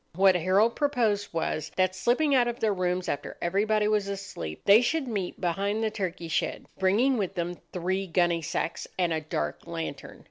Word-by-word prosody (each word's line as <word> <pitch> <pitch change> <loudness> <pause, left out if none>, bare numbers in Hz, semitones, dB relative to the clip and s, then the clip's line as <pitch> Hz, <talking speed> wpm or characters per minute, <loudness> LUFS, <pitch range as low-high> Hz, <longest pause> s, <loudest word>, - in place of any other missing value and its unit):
What 190 +1 +6
Harold 190 +6 +3
proposed 230 -9 +1
was, 160 -2 -2
that, 185 -1 +2
slipping 270 +9 +2
out 250 -3 +4
of 240 0 -3
their 215 -2 +2
rooms 180 -1 -1
after 140 - -4
everybody 210 +4 +1
was 210 -2 +1
asleep, 195 - -6
they 205 +3 +8
should 285 +3 0
meet 200 -6 -3
behind 200 +5 -1
the 220 - 0
turkey 185 -5 -4
shed, 160 - -1
bringing 225 +7 +3
with 195 -1 -2
them 175 0 -3
three 185 +2 -2
gunny 175 -1 +2
sacks 165 +1 -3
and 175 -3 +1
a 160 - -1
dark 75 - -4
lantern. 80 -1 -6
190 Hz, 180 wpm, -27 LUFS, 175-215 Hz, -, they